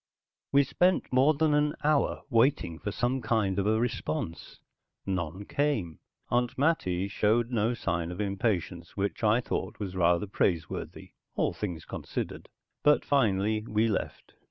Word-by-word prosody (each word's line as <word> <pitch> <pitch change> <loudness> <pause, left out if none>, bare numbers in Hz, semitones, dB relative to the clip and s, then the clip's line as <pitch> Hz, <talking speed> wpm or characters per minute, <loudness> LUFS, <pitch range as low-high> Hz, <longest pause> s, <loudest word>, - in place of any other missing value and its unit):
We 140 0 +5
spent 180 +3 +1
more 135 +4 +5
than 155 0 +2
an 150 0 +2
hour 150 -1 +1
waiting 115 - +2
for 105 - -4
some 125 +5 -1
kind 110 -4 +1
of 100 - 0
a 110 +1 +3
response. 85 -8 -3 0.5
None 95 0 -3
came. 115 - -1 0.3
Aunt 120 0 +1
Mattie 100 - +1
showed 110 +4 +1
no 115 0 +1
sign 85 -6 -2
of 90 - -7
impatience, 95 -5 -2
which 100 +3 -2
I 110 +3 +4
thought - - -3
was 95 -3 -5
rather 90 +1 +3
praiseworthy, 85 -4 -2 0.2
all - - +1
things 90 -6 -5
considered. - - -5 0.3
But 150 0 +4
finally 110 -5 +2
we 110 +2 +2
left. 105 - -3
105 Hz, 145 wpm, -29 LUFS, 95-125 Hz, 0.5 s, We